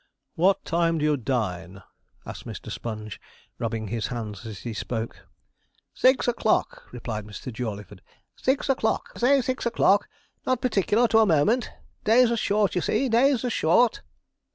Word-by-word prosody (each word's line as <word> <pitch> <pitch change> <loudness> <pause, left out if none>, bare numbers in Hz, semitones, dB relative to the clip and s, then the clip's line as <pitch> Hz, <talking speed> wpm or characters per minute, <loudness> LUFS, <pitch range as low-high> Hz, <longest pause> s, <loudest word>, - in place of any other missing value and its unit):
'What 185 +3 +2
time 165 0 +1
do 150 - 0
you 150 -1 +3
dine?' 100 -8 -3 0.4
asked - - -8
Mr. - - -7
Sponge, 110 -4 -6 0.4
rubbing 115 -3 -3
his 115 -1 -2
hands 110 -3 -6
as 105 -3 -8
he 120 - -5
spoke. 115 +1 -5 0.7
'Six 260 0 +3
o'clock,' 235 -2 0
replied 115 -3 -5
Mr. 110 +4 -8
Jawleyford, 105 -4 -6 0.3
'six 265 +2 0
o'clock 255 -5 0
say 275 +3 +4
six 255 -1 -2
o'clock 205 -3 +3 0.3
not 255 -1 0
particular 235 0 +2
to 225 - +5
a 220 - +5
moment 200 - +2 0.3
days 235 +2 +5
are - - +2
short, 210 -2 +1
you 180 - 0
see 265 +8 0
days 255 +2 +3
are 245 - -1
short.' 225 +7 +3
165 Hz, 155 wpm, -25 LUFS, -, 0.7 s, to